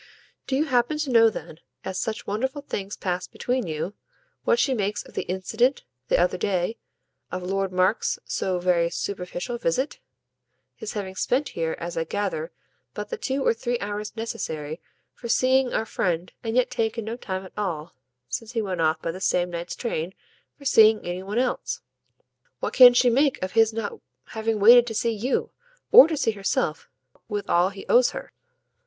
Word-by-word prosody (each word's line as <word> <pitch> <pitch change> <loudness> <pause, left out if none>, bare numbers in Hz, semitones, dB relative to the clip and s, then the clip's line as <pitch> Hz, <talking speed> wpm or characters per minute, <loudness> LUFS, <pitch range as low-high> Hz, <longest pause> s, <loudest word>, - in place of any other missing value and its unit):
"Do 265 - 0
you 295 +3 +2
happen 250 +1 +1
to 300 -3 -2
know 230 -1 +7
then, 165 -6 -8 0.3
as 190 0 -3
such 220 -1 -3
wonderful 265 +7 -2
things 200 -7 -5
pass 180 -1 -2
between 250 -4 -2
you, 160 +5 -3 0.5
what 475 - +4
she 275 - +2
makes 210 -3 -1
of - - -16
the - - -3
incident, 220 +8 +1 0.2
the - - +3
other 180 +1 +1
day, 190 +3 -1 0.5
of 185 0 -4
Lord 195 +1 -1
Mark's 185 +4 +1
so 185 -1 -1
very 175 -1 +2
superficial 195 +6 -4
visit? 255 - -1 0.8
his 215 - -6
having 195 -3 -4
spent 255 +9 0
here, 165 -1 -2
as 170 0 -5
I 165 - 0
gather, 180 -3 -3 0.4
but 210 0 -5
the - - -2
two 270 0 -2
or - - +4
three 240 +1 -2
hours 210 0 -5
necessary 160 -8 -4 0.3
for 235 - -8
seeing 260 +1 +3
our 220 - 0
friend 175 -4 -2
and 225 0 -2
yet 250 0 +2
taken 225 -2 -1
no 225 +1 -3
time 190 -5 -5
at 185 - -13
all, 170 -7 -3 0.3
since 225 - -5
he 230 - 0
went 185 -4 -2
off 160 0 +1
by 165 - -1
the 185 +3 -9
same 180 -2 +1
night's 170 0 -5
train, 185 -6 -3 0.4
for 280 - -15
seeing 220 -4 +5
any 175 +1 -3
one 200 +4 -4
else. 250 0 -1 0.8
What - - -3
can 245 -1 +9
she 245 0 +5
make 275 +3 +2
of 185 - -2
his 225 -1 +4
not 225 - -4 0.3
having 220 -1 -1
waited 240 +3 +8
to 225 - -4
see 230 +2 +1
YOU, 230 +4 -1 0.4
or 475 -3 +10
to 320 -2 -2
see 250 -5 +1
herself 195 -6 -2 0.4
with 205 -2 -3
all 175 +2 +3
he 195 0 -10
owes 245 0 +5
her?" - - -8
210 Hz, 185 wpm, -25 LUFS, 180-245 Hz, 0.8 s, or